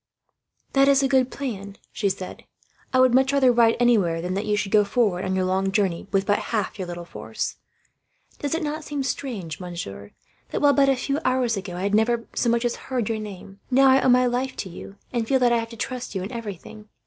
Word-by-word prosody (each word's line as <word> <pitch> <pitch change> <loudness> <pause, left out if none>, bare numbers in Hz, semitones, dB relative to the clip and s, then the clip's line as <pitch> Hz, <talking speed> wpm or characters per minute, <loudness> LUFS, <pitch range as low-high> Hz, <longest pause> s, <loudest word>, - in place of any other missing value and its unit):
"That 275 0 +5
is 275 0 +5
a - - +3
good 260 -2 +3
plan," 200 -9 -6
she 200 - 0
said. 190 -1 -6 0.5
"I 255 - +3
would 255 -1 +5
much 265 +2 +4
rather 265 -3 +4
hide 230 -1 +4
anywhere, 205 -9 +3
than 180 +2 -3
that 200 +3 -2
you 210 0 +1
should 205 -2 -2
go 210 -1 +5
forward 200 -3 +1
on 190 0 -1
your 185 -1 +1
long 190 +1 0
journey 195 -4 0
with 195 -1 +1
but 205 - +2
half 210 -3 -2
your 185 - -3
little 175 0 -6
force. - - -5 0.8
Does 290 +2 -1
it 330 - -2
not 305 +1 -3
seem 290 -2 -3
strange, 225 - -4
monsieur, 165 - -7 0.4
that - - -2
while, 290 -1 +5
but 275 -1 +4
a 270 - +4
few 275 +3 -2
hours 255 -3 +1
ago, 190 -3 -5
I 180 - -4
had 200 +1 0
never 230 +2 +2
so 240 - +1
much 235 +1 +1
as 240 - 0
heard 245 -5 -1
your 225 -1 -1
name, 200 -1 -9
now 270 +1 +5
I 265 +1 +5
owe 260 - +3
my 250 0 +5
life 250 +2 -1
to 190 - -5
you, 190 +3 -10 0.2
and 235 -2 -1
feel 270 - +3
that 245 -2 +3
I 235 - +3
have 230 0 -5
to 230 - -11
trust 250 +2 -4
to - - -2
you 185 - -3
in 195 - -6
everything? 215 -2 -8
225 Hz, 245 wpm, -24 LUFS, 195-255 Hz, 0.8 s, That